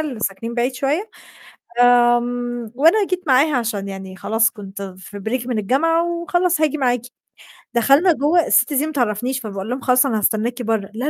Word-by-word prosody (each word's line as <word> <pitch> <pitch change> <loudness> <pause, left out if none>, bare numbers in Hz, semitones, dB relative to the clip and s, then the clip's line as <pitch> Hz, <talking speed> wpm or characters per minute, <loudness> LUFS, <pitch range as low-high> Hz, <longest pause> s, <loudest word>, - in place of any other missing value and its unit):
اللي 275 -8 -4
ساكنين 225 +4 -3
بعيد 250 +2 -1
شوية، 285 +11 -2 0.8
آمم، 240 -1 0
وأنا 335 - +4
جيت 365 -1 -2
معاها 275 +2 +3
عشان 215 -4 -2
يعني 190 -1 -8
خلاص 225 +3 +1
كنت 200 -3 -9 0.2
في 205 +2 -10
break 235 +4 -3
من 245 -3 -2
الجامعة 330 - +1
وخلاص 345 0 0
هاجي 305 -1 +1
معاكِ، 245 -2 +1 0.7
دخلنا 275 +10 +4
جوّه 310 +4 +2
الست - - +3
دي 285 +2 +1
ما 315 - -5
تعرفنيش 245 0 -1
فباقول 200 -2 -6
لهم 255 - -3
"خلاص 255 +1 +3
أنا 225 -5 0
هاستناكِ 230 +4 -1
برّه" 220 -3 -2
"لا، 245 +4 -4
245 Hz, 175 wpm, -20 LUFS, 220-295 Hz, 0.8 s, وأنا